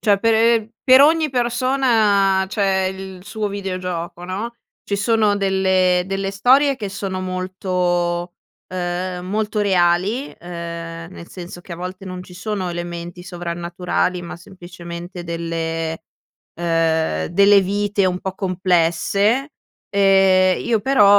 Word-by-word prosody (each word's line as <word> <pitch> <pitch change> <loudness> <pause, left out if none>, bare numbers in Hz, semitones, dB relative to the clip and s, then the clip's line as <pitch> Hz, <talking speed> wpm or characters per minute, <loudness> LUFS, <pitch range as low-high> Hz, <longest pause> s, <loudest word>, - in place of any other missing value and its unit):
Cioè, 205 -3 +3
pe 225 0 +3
per 260 0 +7
ogni 310 +1 +4
persona 235 -6 +2
c'è 195 -2 +1
il 190 -1 -9
suo 215 +1 -3
videogioco, 185 -3 -4
no, 215 +6 -5 0.3
ci 200 - -2
sono 210 0 +2
delle 190 -2 +2
delle 195 +1 -3
storie 265 +8 +4
che 215 -6 -5
sono 195 -1 -4
molto, 180 -1 -1 0.3
uhm, 180 0 -3
molto 210 +2 -1
reali, 190 +6 +1
ehm, 170 0 -7
nel 170 - -11
senso 175 -1 -9
che 175 -1 -8
a - - -10
volte 185 +2 -7
non 185 0 -7
ci 180 - -14
sono 185 0 -3
elementi 175 0 -6
sovrannaturali 175 0 -2
ma, 170 - -7
semplicemente, 175 -1 -9
delle, 165 -1 -3 0.6
uhm, 160 - +1
delle 200 +3 +5
vite 200 +1 0
un 180 0 0
po' 190 -1 -4
complesse, 190 - +1 0.4
ehm, 195 -2 +4
io 230 -2 +1
però 265 -2 +4
185 Hz, 125 wpm, -20 LUFS, 175-205 Hz, 0.6 s, per